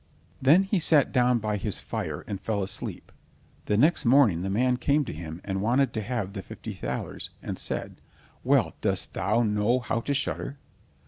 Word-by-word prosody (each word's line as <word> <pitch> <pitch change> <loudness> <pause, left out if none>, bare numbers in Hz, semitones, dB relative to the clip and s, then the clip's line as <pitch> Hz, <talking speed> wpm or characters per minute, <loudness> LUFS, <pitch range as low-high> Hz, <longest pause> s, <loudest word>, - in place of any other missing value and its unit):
Then 155 +9 +6
he 195 0 0
sat 155 -3 +4
down 125 -1 +3
by 105 -2 -1
his 100 0 -3
fire - - -4
and 100 -2 -5
fell 105 -3 -1
asleep, 95 - -5 0.6
and 105 - +2
next 155 +7 +4
morning 120 -9 +5
the 95 - -2
man 125 +5 +2
came 145 +3 +2
to - - -5
him 80 +1 -7
and 95 -1 -2
wanted 125 +4 +2
to 110 - -2
have 105 -3 -3
the 100 - -5
fifty - - -8
thalers, - - -5
and - - -5
said: - - -4 0.4
"Well, - - +3
dost - - 0
thou 115 +2 +1
know 105 +3 +2
how 115 -2 -1
to 140 - -1
shudder?" 140 0 -2
115 Hz, 185 wpm, -27 LUFS, 100-135 Hz, 0.6 s, Then